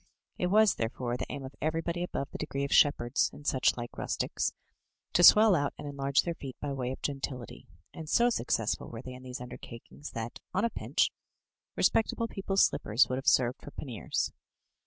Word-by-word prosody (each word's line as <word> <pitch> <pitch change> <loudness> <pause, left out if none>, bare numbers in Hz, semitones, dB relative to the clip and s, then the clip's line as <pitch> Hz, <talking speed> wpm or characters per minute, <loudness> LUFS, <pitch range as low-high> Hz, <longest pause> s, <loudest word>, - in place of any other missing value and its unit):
It 180 - +1
was, 215 +2 +5
therefore, 120 +1 -3
the - - -4
aim 140 -2 -5
of 130 - -9
everybody 165 +2 -1
above 145 -5 -3
the - - -7
degree 140 -2 -3
of 140 - -1
shepherds, 140 -3 +4
and 145 - -13
such 130 -3 +2
like 120 0 -7
rustics, - - -1 0.6
to - - +4
swell 210 +3 +9
out 145 -5 0
and - - -7
enlarge 140 -1 +1
their 170 - -2
feet 135 -5 -8
by 145 -1 -3
way 130 -2 -2
of 130 - -8
gentility; 135 -3 -5 0.3
and 160 -2 -8
so 240 +1 +4
successful 115 - -1
were 115 +1 -8
they 130 - -7
in 125 - -10
these 125 -1 -7
undertakings 125 +3 -9
that, 115 +1 -5 0.2
on 195 - +2
a 235 - 0
pinch, - - 0 0.6
respectable 230 +1 +2
people's 195 -2 +2
slippers 110 +5 +2
would 130 - -1
have 135 - -9
served 125 -2 +3
for - - -9
panniers. 125 -6 -3
140 Hz, 190 wpm, -30 LUFS, 125-165 Hz, 0.6 s, swell